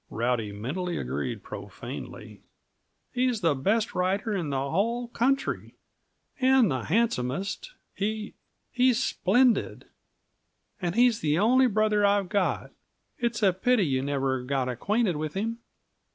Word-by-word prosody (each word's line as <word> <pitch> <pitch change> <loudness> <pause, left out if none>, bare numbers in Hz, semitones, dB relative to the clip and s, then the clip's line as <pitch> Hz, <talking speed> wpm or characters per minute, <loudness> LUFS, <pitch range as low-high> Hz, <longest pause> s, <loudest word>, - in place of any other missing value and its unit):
(Rowdy 115 -2 -1
mentally 150 - -3
agreed 65 +2 -3
profanely.) - - -8 0.7
"He's 250 -3 +1
the 165 -4 +3
best 205 +11 0
rider 195 +4 0
in 175 -7 -2
the 140 - -1
whole 235 +7 0
country 270 +3 -1 0.6
and 260 - +4
the 130 -3 -2
handsomest. 195 - -1 0.2
He 215 +1 -3 0.4
he's 250 -1 +3
splendid! 245 +6 +2 1.0
And 175 0 -2
he's 240 -1 +4
the 150 -6 +1
only 250 +7 +4
brother 215 -1 +2
I've 200 -2 +2
got. 200 -3 0 0.5
It's 235 -2 -1
a 190 -2 +5
pity 215 +2 +2
you 130 -3 0
never 135 -2 -1
got 130 0 -1
acquainted 190 - 0
with 155 +1 -4
him." 225 +4 -2
200 Hz, 125 wpm, -27 LUFS, 145-230 Hz, 1.0 s, a